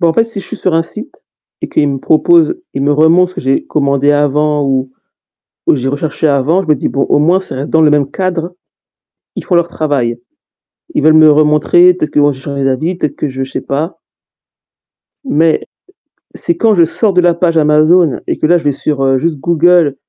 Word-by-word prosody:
bah, 170 - +2
en - - +1
fait 230 - +2
si 225 -3 -6
je - - -5
suis - - -4
sur 185 -4 -1
un 165 - +2
site 245 - -10 0.4
et - - -3
qu'il 145 - 0
me 135 - -3
propose 335 - +2 0.2
il - - -3
me 145 +1 +1
remontre 165 +4 +3
ce 185 - -16
que - - -4
j'ai 135 +1 -1
commandé 140 -1 0
avant 145 0 0
ou 130 -1 -1 0.8
ou - - +4
j'ai 135 -2 -3
recherché 150 +3 -2
avant, 145 +6 +1
je 180 - -11
me 150 - +3
dis: - - -4
«Bon 135 - -2
au - - +2
moins 170 +6 +2
ça 185 - -7
reste 135 +3 -5
dans 160 - +2
le 155 -1 +4
même 145 -2 +1
cadre, 180 0 -4 0.8
ils - - -5
font 180 - -1
leur 170 0 +2
travail. 140 -8 -2 0.8
Ils - - 0
veulent 155 - +5
me 155 0 +6
remontrer, 150 +4 +3
peut-être 155 -4 -4
que - - -2
moi 145 0 +3
j'ai 130 - -11
changé 140 0 -4
d'avis, 135 +7 -1
peut-être 150 -5 -3
que 150 - -4
je 135 0 -5
sais 130 - -5
pas». 150 +6 -4 1.3
Mais 165 - +1 0.7
c'est 340 - -2
quand 225 -1 +2
je 175 -4 +4
sors 195 +5 0
de 180 - +3
la 175 -1 +3
page 170 -1 0
Amazon 155 +1 +3
et - - -2
que 155 - 0
là, 175 - +4
je 170 - -6
vais 145 - +1
sur, 140 0 -3
heu, 135 0 +2
juste 155 +2 -2
Google 170 -2 +2
155 Hz, 225 wpm, -12 LUFS, 140-175 Hz, 1.3 s, me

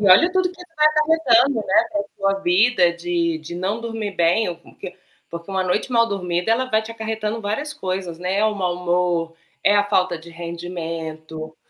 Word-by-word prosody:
E, 205 - +1
olha, 335 - +7
tudo 370 -1 +2
que 360 - -16
você 355 -2 -15
vai 305 0 +5
acarretando, 300 -6 +3
né, 190 - +5 0.4
com 195 -1 0
a - - +4
sua 195 - -5
vida 180 -1 +4
de 170 -1 -1
de 170 +2 -8
não 195 +5 -2
dormir 225 -3 -4
bem, 175 +5 +2
ou 175 - -4
com 170 - -20
hã, - - -19 0.5
porque 170 +3 -8
uma 190 -1 0
noite 185 +7 -1
mal 230 -1 +4
dormida 180 -1 -1
ela 255 +3 +2
vai 220 -1 +2
te 220 - -8
acarretando 220 0 -3
várias 250 +9 -3
coisas, 185 - -4
né, 185 +2 -1
é 215 - +3
o 215 -1 0
mau 180 -3 -1
humor, 175 -2 0 0.3
é 205 - +5
a 205 - +4
falta 185 -4 +1
de 165 +1 -13
rendimento, 165 -2 -6
190 Hz, 210 wpm, -21 LUFS, 170-225 Hz, 0.5 s, olha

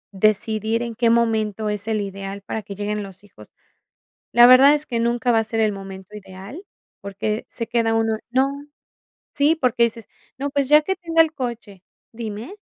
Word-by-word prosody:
decidir 215 +3 +1
en 235 -1 -5
qué 230 0 +1
momento 220 -2 +1
es 210 0 -4
el 220 -1 0
ideal 195 0 -6
para 220 - -4
que 200 -1 -9
lleguen 210 +1 -3
los 195 -1 -11
hijos. 105 - -17 0.8
La 240 0 +7
verdad 260 +3 +8
es 300 0 0
que 235 -2 -2
nunca 240 +1 +1
va 225 - +3
a - - -2
ser 225 +1 -4
el 215 -1 +2
momento 195 +1 -10
ideal, 195 - -10 0.4
porque 205 +2 -4
se 230 - -5
queda 230 -1 0
uno 225 -1 0
no, 260 +2 +2 0.9
sí, 290 +3 +3
porque 250 -6 0
dices: 230 -1 -2 0.3
"No, 280 +1 -3
pues 280 -1 -1
ya 300 0 +7
que 385 - -1
tenga 335 -3 +2
el 315 -1 -5
coche". 235 - -6 0.3
¿Dime? 225 - -7
225 Hz, 185 wpm, -21 LUFS, 205-245 Hz, 0.9 s, verdad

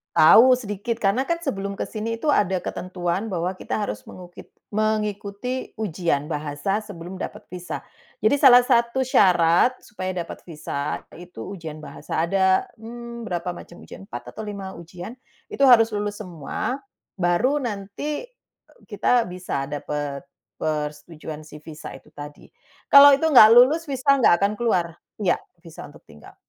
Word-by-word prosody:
Tahu 250 +10 +7
sedikit, 215 +1 -4
karena 215 +4 +1
kan 335 +4 -2
sebelum 200 -11 -4
ke - - -2
sini 225 +1 -4
tu, 310 - -4
ada 190 -10 +2
ketentuan 185 +4 -4
bahwa 180 +1 -2
kita 185 - -4
harus 105 - -4
mengukit 180 +5 -13 0.2
mengikuti 215 +3 -2
ujian 170 -7 -1
bahasa 155 +7 -2
sebelum 185 -3 -9
dapat 185 - -7
visa. 180 -1 -6 0.4
Jadi 215 +6 +3
salah 265 -3 +8
satu 245 +1 +1
syarat 180 +2 +4
supaya 185 -3 -6
dapat 175 -2 -6
visa, 150 -3 -4 0.2
itu 175 -6 -12 0.2
ujian 160 -4 -8
bahasa 150 +2 -4
ada. 190 +1 +2
Mmm, 235 +1 -9
berapa 180 -3 -4
macam 175 - -12
ujian, - - -11
4 200 - -9
atau 220 - -6
5 200 -2 -7
ujian, 175 +6 -9 0.3
itu 275 - -2
harus 240 -4 +7
lulus 205 0 -3
semua, 180 - -4 0.4
baru 215 +11 +1
nanti 230 - -5
e - - -33 0.2
kita 245 -1 +2
bisa 180 -6 -4
dapat 145 0 -5 0.3
persetujuan 150 0 -5
si 150 0 -13
visa 155 -1 -10
itu - - -17
tadi. 145 0 -11 0.4
Kalau 280 0 +10
itu 280 - -6
nggak 240 -6 +10
lulus, 300 +7 +5
visa 275 0 +1
nggak 185 -6 +4
akan 200 - +3
keluar 180 -8 +1 0.3
iya, 175 - +2 0.2
visa 165 -1 -10
untuk 145 - -17
tinggal. 75 0 -16
195 Hz, 150 wpm, -23 LUFS, 170-235 Hz, 0.4 s, Kalau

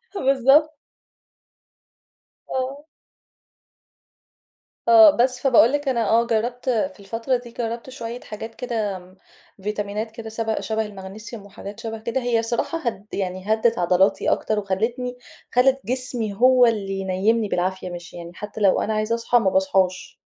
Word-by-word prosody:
بالضبط. 275 +1 +3 1.7
آه. 265 +3 -3 2.0
آه، 335 -2 +9
بس، 250 +1 +2
فباقول 245 -3 +5
لِك 290 -1 -1
أنا 235 -5 +1
آه 230 +1 +3
جرّبت 240 +3 -1
في 255 +2 -1
الفترة 225 +5 -1
دي، 240 -1 -12
جرّبت 235 +1 -4
شويّة 240 -2 -6
حاجات 225 +1 -8
كده 215 -6 -3 0.6
فيتامينات 210 +1 -3
كده 225 0 -8
سب 225 0 -2
شَبه 220 0 -1
الماغنيسيوم 205 +2 -9
وحاجات 200 +1 -10
شَبه 225 -1 -5
كده، 235 +4 -2
هي 240 -2 +1
الصراحة 235 +8 -1
هد 235 -9 -4
يعني 185 +2 -1
هدِّت 225 +1 +1
عضلاتي 180 +2 +2
أكتر 215 -1 0
وخلّتني، 235 +6 -2 0.3
خلّت 265 +2 +4
جسمي 245 -3 -1
هو 250 +4 +5
اللي 205 -4 0
ينيّمني 195 +4 +1
بالعافية، 185 +1 -2
مش 175 -1 -9
يعني 170 0 -8
حتى 210 +2 -7
لو 195 -2 +4
أنا 220 - -1
عايزة 215 +2 0
أصحى 235 +1 +2
ما 195 - +2
باصحاش. 190 -1 0
225 Hz, 140 wpm, -23 LUFS, 200-245 Hz, 2.0 s, آه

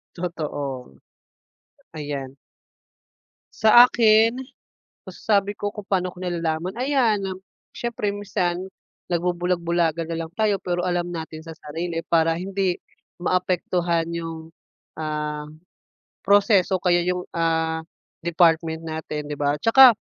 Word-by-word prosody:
Totoo. 145 - -4 1.0
Ayan. 145 -3 -5 1.2
Sa 220 +3 +8
akin, 230 +1 +4 0.7
masasabi 200 +1 0
ko 205 0 -3
kung 210 -2 -9
paano 185 -2 0
ko 180 - -13
nalalaman? 170 +1 -2
Ayan. 245 -6 +2 0.5
Syempre 220 -4 -2
minsan, 185 -2 -2 0.4
nagbubulag-bulagan 170 -1 0
na - - -2
lang 160 - -11
tayo 210 -3 +1
pero 175 -1 -2
alam 175 -1 0
natin 160 -2 -6
sa 165 -1 -10
sarili 165 +2 -4
para 165 -1 +2
hindi 190 0 -1 0.4
maapektuhan 175 -2 0
yung, 165 -1 -6 0.5
ah, 150 -1 -3 0.8
proseso 200 -2 +4
o - - -31
kaya 175 -1 +3
yung, 180 0 -2
ah, 160 -1 0 0.4
department 165 -1 +2
natin, 155 -2 -5
'di 150 - -4
ba? 145 0 0
'Tsaka 255 +5 +8
175 Hz, 110 wpm, -23 LUFS, 160-195 Hz, 1.2 s, Sa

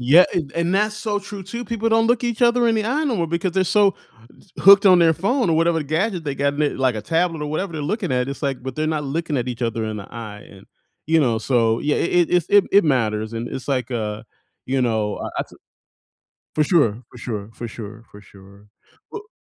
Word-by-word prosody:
Yeah, 145 +9 +6
an 155 -5 -2
and 170 +2 0
that's 210 +2 +1
so 210 -1 -2
true 200 -1 -8
too, 235 +6 -6
people 230 +1 -2
don't 225 0 +3
look 240 0 +2
each 235 -2 -2
other 240 0 +4
in 225 - +2
the 215 - 0
eye 270 +7 0
no 260 -6 0
more 170 -3 0
because 170 +2 -2
they're 190 +1 +2
so 200 +1 +3 0.7
hooked 200 +1 +7
on 180 -2 +7
their 165 -1 +5
phone 235 - 0
or 160 - +2
whatever 165 -1 +2
gadget 170 +6 -1
they 140 -2 -3
got, 140 +1 0
l 150 - 0
like 130 -2 +1
a 105 - -5
tablet 165 +4 0
or - - -3
whatever 170 +4 -3
they're 155 -2 -4
looking 210 - -2
at, 125 0 0
it's 140 +2 -7
like 135 -3 -2
but 130 +1 -6
they're 155 - -1
not 155 -1 -1
looking 155 +2 -2
at 125 -1 -2
each 125 0 -5
other 115 -1 -1
in 110 0 -4
the 100 - -8
eye 105 -3 -9
and, 95 -1 -16 0.4
you 165 +1 +3
know, 115 -5 +1
so 115 -1 +1
yeah, 150 - 0
it 175 0 +2
it - - -13
it's 175 -3 +2
it 205 -1 +5
it 200 -1 +6
matters, 110 -6 0
and 115 +1 -4
it's 130 - -7
like, 130 -2 -1
uh, 110 -3 -3 0.4
you 135 +1 0
know, 110 -3 -1
I - - -5
I - - 0
took - - -18 1.0
For 155 - +3
sure, 135 - +2
for - - -13
sure, 105 -4 -5
for 120 - -7
sure, 110 0 -9
for 105 - -13
sure. 100 +1 -18 0.4
Well 430 0 -9
150 Hz, 245 wpm, -21 LUFS, 120-195 Hz, 1.0 s, hooked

